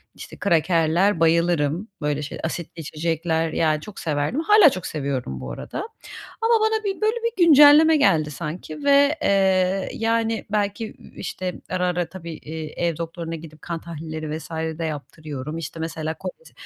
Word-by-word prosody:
işte, -, -, -10 dB
krakerler, 170 Hz, +1 st, +2 dB
bayılırım. 165 Hz, +1 st, +2 dB
Böyle 150 Hz, 0 st, -1 dB
şeyle 150 Hz, -, -6 dB
asitli 170 Hz, +1 st, -4 dB
içecekler 160 Hz, +1 st, -1 dB
ya 155 Hz, -2 st, +2 dB
çok 210 Hz, +4 st, -10 dB
severdim. 150 Hz, -, -1 dB
Hâlâ 410 Hz, 0 st, +7 dB
çok 185 Hz, -8 st, -5 dB
seviyorum 135 Hz, -, -3 dB
bu 65 Hz, 0 st, -6 dB
arada. 65 Hz, -, -6 dB, 0.6 s
Ama 455 Hz, +1 st, +3 dB
bana 440 Hz, 0 st, +1 dB
bir 395 Hz, -1 st, -3 dB
böyle, 435 Hz, +2 st, +2 dB
bir 465 Hz, -7 st, +2 dB
güncelleme 305 Hz, +1 st, +8 dB
geldi 160 Hz, -, +3 dB
sanki 155 Hz, 0 st, -6 dB
ve, 285 Hz, +1 st, +5 dB
eee, 190 Hz, -1 st, +2 dB
yani, 225 Hz, 0 st, 0 dB
belki, 205 Hz, +1 st, 0 dB
i -, -, -16 dB
işte, 185 Hz, -1 st, -4 dB
ara, 180 Hz, 0 st, 0 dB
ara, 175 Hz, -1 st, -1 dB
tabii, 170 Hz, -2 st, -8 dB
eee, 160 Hz, +2 st, -4 dB
ev 165 Hz, -3 st, -2 dB
doktoruna 165 Hz, 0 st, -5 dB
gidip 155 Hz, -1 st, -11 dB
kan 170 Hz, -1 st, -4 dB
tahlilleri 155 Hz, -1 st, -5 dB
vs. 160 Hz, -, -11 dB
de 160 Hz, 0 st, -3 dB
yaptırıyorum, 150 Hz, -1 st, -6 dB
işte, 165 Hz, 0 st, -6 dB
mesela 160 Hz, -1 st, -3 dB
koles 190 Hz, -, -8 dB
170 Hz, 160 wpm, -23 LUFS, 155-205 Hz, 0.6 s, güncelleme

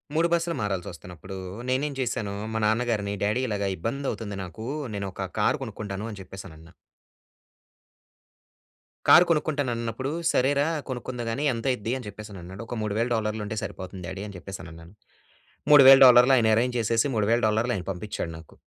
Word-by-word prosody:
3 165 Hz, +1 st, +3 dB
బస్సులు 170 Hz, -1 st, 0 dB
మారాల్సొస్తున్నప్పుడూ, 95 Hz, -1 st, -5 dB, 0.3 s
నేనేం 140 Hz, +3 st, 0 dB
జేశాను. 115 Hz, -5 st, -2 dB, 0.2 s
మా -, -, +1 dB
నాన్నగారిని 110 Hz, -2 st, 0 dB
డ్యాడీ 105 Hz, +5 st, +1 dB
ఇలాగ 100 Hz, -2 st, -1 dB
ఇబ్బంది 135 Hz, +9 st, -3 dB
అవుతుంది 105 Hz, -3 st, -6 dB
నాకు. 95 Hz, +6 st, -8 dB, 0.3 s
నేను 100 Hz, -1 st, -3 dB
ఒక 95 Hz, -1 st, -5 dB
కారు 120 Hz, +7 st, +2 dB
కొనుక్కుంటాను 105 Hz, -2 st, -6 dB
అని 100 Hz, -, -9 dB
చెప్పేసి 95 Hz, +1 st, -10 dB
అనన్నా. 80 Hz, +2 st, -15 dB, 2.4 s
కారు 175 Hz, -, +8 dB
కొనుక్కుంటాను 150 Hz, -5 st, 0 dB
అన్నప్పుడు, 115 Hz, +4 st, -3 dB, 0.2 s
"సరేరా 140 Hz, +3 st, +2 dB, 0.2 s
కొనుక్కుందువుగాని 125 Hz, +1 st, -3 dB
ఎంత 115 Hz, +1 st, -6 dB
అయిద్ది" 120 Hz, 0 st, -2 dB
అని 125 Hz, -, -9 dB
చెప్పేసి 105 Hz, +1 st, -9 dB
అన్నాడు. 95 Hz, +5 st, -9 dB
ఒక 120 Hz, -, -5 dB
3000 110 Hz, +3 st, -1 dB
డాలర్లు 110 Hz, 0 st, -2 dB
ఉంటే 110 Hz, +2 st, -4 dB
సరిపోతుంది 95 Hz, -1 st, -7 dB
డ్యాడీ 95 Hz, +3 st, -6 dB
అని 100 Hz, -, -10 dB
చెప్పేసి 95 Hz, +1 st, -8 dB
అనన్నాను. 85 Hz, +2 st, -12 dB, 0.8 s
3000 135 Hz, -2 st, +10 dB
డాలర్లు 125 Hz, +1 st, +7 dB
ఆయన 110 Hz, -2 st, +3 dB
అరేంజ్ 125 Hz, +1 st, +1 dB
చేసేసి 115 Hz, +4 st, +1 dB
3000 110 Hz, +3 st, +2 dB
డాలర్లు 110 Hz, +3 st, +1 dB
ఆయన 90 Hz, -, -6 dB
పంపిచ్చాడు 90 Hz, -2 st, -5 dB
నాకు. 80 Hz, -, -15 dB
110 Hz, 155 wpm, -26 LUFS, 100-125 Hz, 2.4 s, 3000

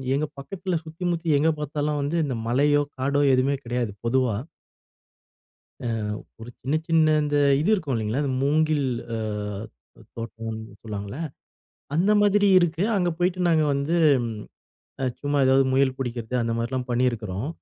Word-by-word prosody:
எங்க 150 Hz, +2 st, 0 dB
பக்கத்தில 180 Hz, +4 st, -3 dB
சுத்தி, 160 Hz, +3 st, -8 dB
முத்தி 170 Hz, 0 st, -3 dB
எங்க 160 Hz, +2 st, +3 dB
பார்த்தாலும் 150 Hz, 0 st, -2 dB
வந்து 145 Hz, +4 st, -1 dB
இந்த 130 Hz, -4 st, -2 dB
மலையோ, 145 Hz, +4 st, +3 dB, 0.2 s
காடோ, 140 Hz, +2 st, +1 dB
எதுவுமே 135 Hz, +2 st, +2 dB
கிடையாது, 120 Hz, -2 st, -1 dB
பொதுவா. 125 Hz, -2 st, +2 dB, 1.5 s
அ. -, -, -4 dB, 0.6 s
ஒரு 115 Hz, -, -8 dB
சின்ன, 140 Hz, +4 st, -1 dB
சின்ன 160 Hz, -2 st, +4 dB
இந்த 145 Hz, 0 st, 0 dB, 0.2 s
இது 170 Hz, -, +1 dB
இருக்கும் 160 Hz, -10 st, -1 dB
இல்லைங்களா? 110 Hz, +4 st, -1 dB
அந்த 140 Hz, -, -1 dB
மூங்கில் 150 Hz, 0 st, +2 dB, 0.3 s
அ -, -, -2 dB, 0.8 s
தோ -, -, -15 dB, 0.2 s
தோட்டம்னு 110 Hz, -2 st, -6 dB
சொல்லுவாங்கல்ல, 100 Hz, 0 st, -6 dB, 0.8 s
அந்த 190 Hz, +6 st, +3 dB
மாதிரி 205 Hz, 0 st, +4 dB
இருக்கு. 170 Hz, -1 st, 0 dB
அங்க 180 Hz, -2 st, +1 dB
போய்ட்டு 180 Hz, +1 st, 0 dB
நாங்க 160 Hz, -2 st, +3 dB
வந்து, 140 Hz, +5 st, 0 dB, 1.2 s
சும்மா 145 Hz, 0 st, -1 dB
ஏதாவது 135 Hz, +1 st, +5 dB
முயல் 130 Hz, -1 st, +3 dB
புடிக்கிறது 120 Hz, -2 st, -4 dB
அந்த 115 Hz, -, -1 dB
மாரிலாம் 125 Hz, +2 st, -2 dB
பண்ணியிருக்கிறோம். 120 Hz, -3 st, -1 dB
140 Hz, 140 wpm, -25 LUFS, 120-155 Hz, 1.5 s, ஏதாவது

